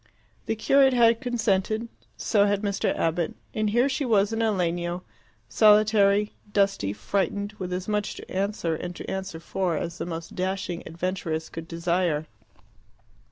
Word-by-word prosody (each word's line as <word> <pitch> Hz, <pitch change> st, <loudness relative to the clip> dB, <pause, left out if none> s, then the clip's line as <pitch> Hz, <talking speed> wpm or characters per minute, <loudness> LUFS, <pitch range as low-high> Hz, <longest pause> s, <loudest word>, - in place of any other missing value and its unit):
The 225 Hz, -, 0 dB
curate 270 Hz, +4 st, +4 dB
had 230 Hz, -1 st, +4 dB
consented; 220 Hz, -2 st, 0 dB, 0.3 s
so 205 Hz, -1 st, +3 dB
had 205 Hz, 0 st, 0 dB
Mr. 200 Hz, -1 st, 0 dB
Abbott. 165 Hz, 0 st, 0 dB, 0.2 s
And 215 Hz, -1 st, 0 dB
here 240 Hz, +5 st, +3 dB
she 280 Hz, +2 st, -1 dB
was 215 Hz, -4 st, +2 dB
in 225 Hz, -, -1 dB
a 225 Hz, -1 st, +3 dB
legno, 175 Hz, -1 st, -1 dB, 0.4 s
solitary, 210 Hz, -1 st, +4 dB, 0.2 s
dusty, 195 Hz, -, +1 dB
frightened, 200 Hz, -, -2 dB
with 185 Hz, -1 st, -4 dB
as 180 Hz, +1 st, -3 dB
much 210 Hz, -1 st, -1 dB
to -, -, -10 dB
answer 195 Hz, -3 st, -1 dB
and 175 Hz, +2 st, -5 dB
to -, -, -8 dB
answer 190 Hz, -3 st, -4 dB
for 175 Hz, -1 st, -1 dB
as 170 Hz, +2 st, -4 dB
the -, -, -3 dB
most 165 Hz, -1 st, -6 dB
dashing 185 Hz, -1 st, -2 dB
adventuress 165 Hz, -2 st, -3 dB
could 165 Hz, 0 st, -7 dB
desire. 170 Hz, -2 st, 0 dB
195 Hz, 155 wpm, -26 LUFS, 175-215 Hz, 0.4 s, curate